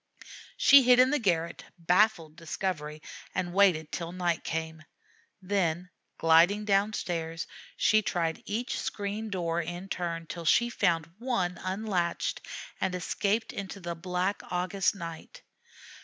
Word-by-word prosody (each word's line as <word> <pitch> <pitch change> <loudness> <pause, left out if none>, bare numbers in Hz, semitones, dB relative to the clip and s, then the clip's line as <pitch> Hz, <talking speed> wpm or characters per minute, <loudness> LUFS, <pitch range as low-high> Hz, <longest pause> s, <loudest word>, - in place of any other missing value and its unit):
She 280 0 +8
hid 250 -1 +6
in 255 +1 +6
the 295 - +2
garret, 170 -6 0
baffled 175 -2 +2
discovery, 155 -3 -4 0.3
and 180 -1 -2
waited 180 -6 +3
till 170 -1 -4
night 175 -2 -1
came. 160 0 -4 0.6
Then, 180 -2 -1 0.3
gliding 170 +6 +4
down 205 +1 +2
stairs, 165 -3 -3 0.3
she 215 0 +4
tried 165 -5 -1
each 235 +4 -2
screen 205 +2 -4
door 170 -3 -1
in 175 +3 -6
turn, 170 -2 -3
till 170 +1 -7
she 235 +8 +4
found 170 -8 +1
one 190 -8 -1
unlatched, 185 -2 -1 0.4
and 190 -1 0
escaped 200 +5 -1
into 200 0 -6
the 175 -2 -4
black 180 +3 -2
August 185 +2 0
night. 165 -4 -9
180 Hz, 130 wpm, -29 LUFS, 165-200 Hz, 0.6 s, She